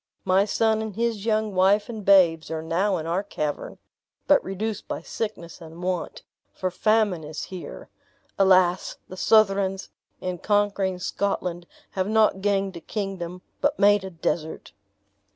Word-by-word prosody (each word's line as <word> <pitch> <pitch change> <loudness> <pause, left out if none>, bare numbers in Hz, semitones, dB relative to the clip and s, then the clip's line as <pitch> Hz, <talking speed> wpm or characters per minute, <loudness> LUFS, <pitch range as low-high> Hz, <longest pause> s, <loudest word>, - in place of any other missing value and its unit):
My 190 +1 +4
son 220 +1 +1
and 220 -3 -5
his 230 -2 -1
young 215 -1 +1
wife 195 +3 +3
and 220 -3 -6
babes 180 -5 +5
are 160 -1 -4
now 185 +4 +1
in 160 - -5
our 170 +4 0
cavern, 150 -7 -4 0.5
but - - +4
reduced 205 +3 -4
by - - -5
sickness 185 -6 -5
and 165 +2 -10
want, 180 -1 -3 0.3
for 185 -1 -3
famine 210 -2 +1
is 155 +1 -6
here. 185 -2 -8 0.5
Alas, 185 -2 +3
the 185 - -8
Southrons, 195 -2 +2 0.3
in 180 -1 -4
conquering 205 -3 +1
Scotland, 180 -2 -2 0.2
have 190 0 -1
not 215 -3 +3
gained 195 -2 0
a 170 - -8
kingdom, 180 -4 -5 0.2
but 290 +1 +1
made 205 -1 +4
a 190 - -5
desert!" 160 -2 -3
190 Hz, 150 wpm, -25 LUFS, 180-205 Hz, 0.5 s, babes